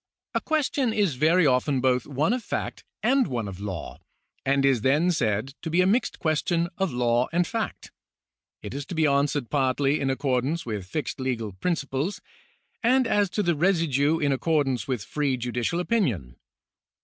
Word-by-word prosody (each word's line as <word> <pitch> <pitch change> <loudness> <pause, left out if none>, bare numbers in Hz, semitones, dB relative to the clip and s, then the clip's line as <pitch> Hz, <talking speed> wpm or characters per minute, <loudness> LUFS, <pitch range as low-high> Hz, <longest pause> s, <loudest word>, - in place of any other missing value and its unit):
A - - 0
question 280 -6 0
is 200 -8 +2
very 160 +6 +3
often 130 +1 +2
both 125 -1 +1
one 150 - +1
of 250 -2 -2
fact - - -4 0.2
and 265 0 +3
one 115 -4 -3
of 95 -2 -7
law, 95 -4 -6 0.4
and 140 +1 +2
is 135 -5 +3
then 150 +8 +3
said 115 - -1
to 160 - -4
be 170 +3 +1
a 185 - +5
mixed 220 +7 +1
question 165 +2 0
of 190 -2 +1
law 120 0 +1
and 175 +2 +2
of - - -7
fact. 225 -1 -4 0.7
It - - -6
is 140 +1 -4
to 175 - -5
be 160 -1 +3
answered 140 -2 +1
partly 140 +1 +1
in 135 - 0
accordance 135 +3 0
with 105 -5 -4
fixed 150 +6 -4
legal 120 -5 -2
principles, 140 - -2 0.6
and 255 +2 +3
as 205 -3 +2
to 210 - -1
the 175 -2 +2
residue 160 -3 +2
in 145 -3 +1
accordance 135 -3 0
with 125 -6 -2
free 140 -3 -1
judicial 125 +6 -2
opinion. 130 - 0
145 Hz, 175 wpm, -26 LUFS, 125-175 Hz, 0.7 s, a